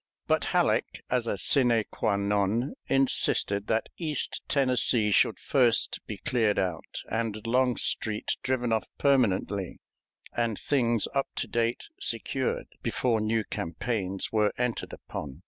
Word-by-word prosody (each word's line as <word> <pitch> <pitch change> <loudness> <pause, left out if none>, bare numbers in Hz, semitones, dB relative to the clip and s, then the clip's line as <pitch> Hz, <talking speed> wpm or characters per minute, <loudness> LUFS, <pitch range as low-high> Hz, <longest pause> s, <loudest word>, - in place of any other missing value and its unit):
But - - +1
Halleck, - - +1
as 125 -2 +1
a 100 - -1
sine 120 +1 +3
qua 100 - 0
non, 100 +5 0
insisted 105 -6 +2
that 110 - +1
East 155 -4 -3
Tennessee 125 -5 +2
should - - +3
first 120 -4 +2
be 105 - -5
cleared 115 -7 +1
out 90 -4 -3
and 110 -1 -2
Longstreet 120 -3 +1
driven 125 -3 0
off 110 - 0
permanently 100 -8 +1 0.6
and 115 -3 0
things 120 -5 +1
up 135 -1 +1
to - - -1
date 115 +1 0 0.2
secured, 470 +4 -1 0.2
before 115 -4 0
new 110 +1 +1
campaigns 95 +2 -3
were 105 -1 +2
entered 125 -1 -2
upon. 70 -1 -7
115 Hz, 130 wpm, -28 LUFS, 105-125 Hz, 0.6 s, sine